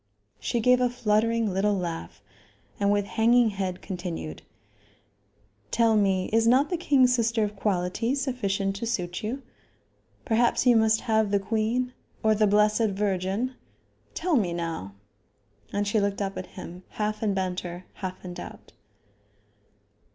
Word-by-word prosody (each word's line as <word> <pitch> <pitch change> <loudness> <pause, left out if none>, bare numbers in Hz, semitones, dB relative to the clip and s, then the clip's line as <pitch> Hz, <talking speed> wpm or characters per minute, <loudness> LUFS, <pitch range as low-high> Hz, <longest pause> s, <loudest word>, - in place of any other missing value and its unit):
She 240 - -1
gave 250 +2 +4
a 250 - +3
fluttering 230 -2 +1
little 200 +2 +2
laugh, 165 - -5 0.6
and, 200 0 +2
with 205 -1 +1
hanging 230 +2 +3
head, 190 -2 -4
continued: 175 - -5 1.3
"Tell 230 -1 +3
me, 195 -3 +2
is 225 0 +4
not 265 +7 +4
the - - +2
king's 270 -7 +4
sister 230 -2 +1
of 210 0 -2
quality 200 +5 0
sufficient 200 -8 -1
to 230 - -4
suit 175 -6 -2
you? 250 +6 -4 0.8
Perhaps 235 +1 +2
you 245 -1 +6
must 220 0 +3
have 220 -3 +1
the 200 0 +2
queen 225 +5 -1 0.3
or 220 0 +4
the 215 0 +3
Blessed 210 +2 +3
Virgin? 195 +4 -1 0.6
Tell 345 -1 +1
me 190 -9 +1
now?" 165 - -4 0.8
And 205 0 -1
she 215 +2 +2
looked 200 0 -1
up 195 -1 -2
at 185 - -5
him, 175 +2 -8 0.2
half 215 0 -1
in 205 -3 0
banter, 180 -1 -3
half 185 -1 -7
in 180 - -6
doubt. - - -10
210 Hz, 145 wpm, -26 LUFS, 190-230 Hz, 1.3 s, you